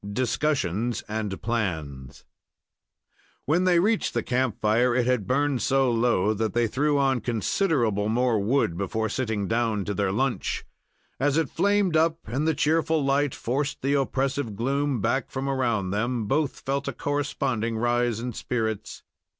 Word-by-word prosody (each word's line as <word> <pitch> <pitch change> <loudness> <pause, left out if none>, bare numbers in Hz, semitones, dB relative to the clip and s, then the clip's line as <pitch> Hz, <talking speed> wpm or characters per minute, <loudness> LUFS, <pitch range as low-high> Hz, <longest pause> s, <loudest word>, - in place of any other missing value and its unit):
DISCUSSIONS 120 - 0
AND 105 -3 -3
PLANS 80 - -3 1.2
When 170 +6 +2
they 175 -2 +4
reached 215 - +1
the 120 - 0
camp 125 -3 -1
fire, 120 +3 +2
it 125 -1 +2
had 125 -6 0
burned 140 0 +1
so 135 -2 +2
low 115 -3 +2
that 110 -1 -2
they 120 0 +2
threw 145 +6 +1
on 135 -3 +2
considerable 115 - 0
more 120 -1 +2
wood 100 -5 +1
before 110 +3 -1
sitting 110 -6 -2
down 115 -3 0
to 105 - -2
their 100 -1 0
lunch. 125 +5 -1 0.5
As 145 +2 +2
it 160 -4 0
flamed 200 -1 +2
up 160 +1 +3
and 135 +9 -1
the 160 - +2
cheerful 160 0 +1
light 140 0 +1
forced 140 +4 -2
the 140 +1 +1
oppressive 135 -4 -1
gloom 135 +2 0
back 120 +4 0
from 135 +1 -4
around 120 -8 0
them, 115 +2 -1
both 140 +5 -1
felt 140 +1 -2
a - - -2
corresponding 135 -6 -2
rise 120 -1 +1
in 120 +1 -4
spirits. 110 -3 -3
125 Hz, 155 wpm, -25 LUFS, 110-140 Hz, 1.2 s, they